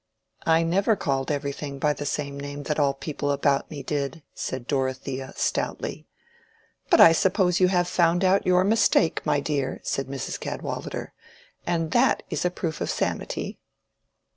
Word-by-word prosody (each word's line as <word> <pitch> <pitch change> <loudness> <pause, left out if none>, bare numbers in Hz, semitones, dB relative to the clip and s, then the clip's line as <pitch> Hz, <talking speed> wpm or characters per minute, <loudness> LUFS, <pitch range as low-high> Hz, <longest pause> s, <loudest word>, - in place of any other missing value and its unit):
"I 165 0 +4
never 195 +6 +2
called 135 -7 -1
everything 140 -1 -3
by 150 +2 +2
the 145 0 -5
same 140 -1 -3
name 145 0 -6
that 150 +2 -1
all 140 -2 +3
the - - -23
people 145 0 -3
about 140 0 +1
me 145 -3 -7
did," 145 +1 -3
said 130 -2 -4
Dorothea, 130 -1 -2
stoutly. - - -2 0.8
"But - - +5
I 165 - +10
suppose 180 +1 +2
you 185 - +5
have 175 -1 +2
found 175 +1 +2
out 190 +1 +4
your 180 0 +5
mistake, 200 -5 +3
my 145 - +3
dear," 140 -2 -2
said 135 - -2
Mrs. 135 -2 -4
Cadwallader, - - -5 0.5
"and 165 -2 0
that 250 +2 +3
is - - -1
a 180 - +2
proof 165 -3 -4
of - - -1
sanity." - - -3
150 Hz, 165 wpm, -25 LUFS, 140-175 Hz, 0.8 s, I